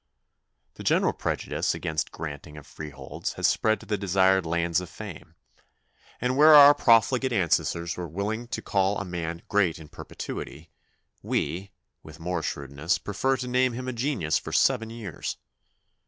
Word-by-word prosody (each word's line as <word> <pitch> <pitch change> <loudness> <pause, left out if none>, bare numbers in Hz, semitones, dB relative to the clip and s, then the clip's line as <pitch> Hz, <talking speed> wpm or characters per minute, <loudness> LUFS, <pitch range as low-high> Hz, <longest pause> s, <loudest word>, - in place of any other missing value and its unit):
The - - -10
general - - +2
prejudice - - -2
against 80 -1 -2
the - - -14
granting 75 -1 -7
of 75 - -11
free 75 - -8
holds 70 - -6
has - - -2
spread 110 0 +2
to - - -12
the 105 -2 -2
desired 95 -2 +3
lands 85 +1 0
of 90 - -8
fame; - - -10 0.8
and 125 +1 0
where 155 +2 +8
our 145 0 +10
profligate 125 +1 +3
ancestors 85 -4 0
were 90 -1 -4
willing 105 +8 -3
to - - -5
call 100 0 +1
a 100 - -4
man 85 -2 -5
great 100 -5 +2
in 80 -2 -12
perpetuity, 80 +3 -8 0.5
we, 95 +4 -2 0.3
with 80 +1 -13
more 90 +1 -2
shrewdness, 70 +5 -2
prefer 130 +7 -1
to 125 0 -5
name 125 0 +2
him 130 +2 -5
a 130 - -2
genius 115 - 0
for - - -8
seven 115 -4 +2
years. 115 -7 -6
95 Hz, 165 wpm, -26 LUFS, 80-120 Hz, 0.8 s, our